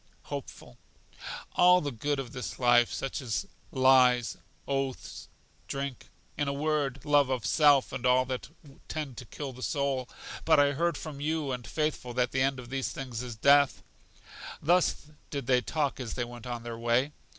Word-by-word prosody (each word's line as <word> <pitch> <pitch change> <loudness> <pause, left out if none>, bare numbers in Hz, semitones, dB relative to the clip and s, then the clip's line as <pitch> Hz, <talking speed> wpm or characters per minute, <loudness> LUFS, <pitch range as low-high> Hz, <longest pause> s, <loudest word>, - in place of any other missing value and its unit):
Hopeful. 60 - -8 0.7
All 180 0 +6
the 145 -4 -3
good 140 +4 -2
of 125 -3 -5
this 125 -3 -5
life; 120 -1 +4
such 135 +1 -3
as 125 - -2 0.3
lies, 130 -3 +4 0.3
oaths, 135 -2 -3 0.4
drink; 140 -2 -5 0.3
in 145 - -1
a 140 - 0
word, 145 -2 -1
love 145 -2 +4
of 125 -6 -1
self 145 - +4
and 125 - -5
all 130 0 +4
that 130 +1 -5 0.4
tend 150 -5 -4
to 125 - -7
kill 135 +4 -6
the 125 - -12
soul. 135 -3 -1 0.3
But 160 -2 +5
I 145 0 +5
heard 170 +3 0
from 145 -3 -7
you 155 -2 -1
and 125 -2 -5
Faithful 150 -6 -2
that 125 -1 +1
the 130 - 0
end 135 0 +2
of 125 0 -10
these 135 -1 -1
things 125 -3 -5
is 125 -2 -6
death. 140 +4 +4 0.8
Thus 175 0 +2 0.2
did 140 -3 -4
they 125 0 +3
talk 145 0 -1
as 125 -3 -5
they 120 - -1
went 120 0 -10
on 120 -1 -4
their 115 -1 -6
way. 120 +5 +2
135 Hz, 175 wpm, -29 LUFS, 125-145 Hz, 0.8 s, All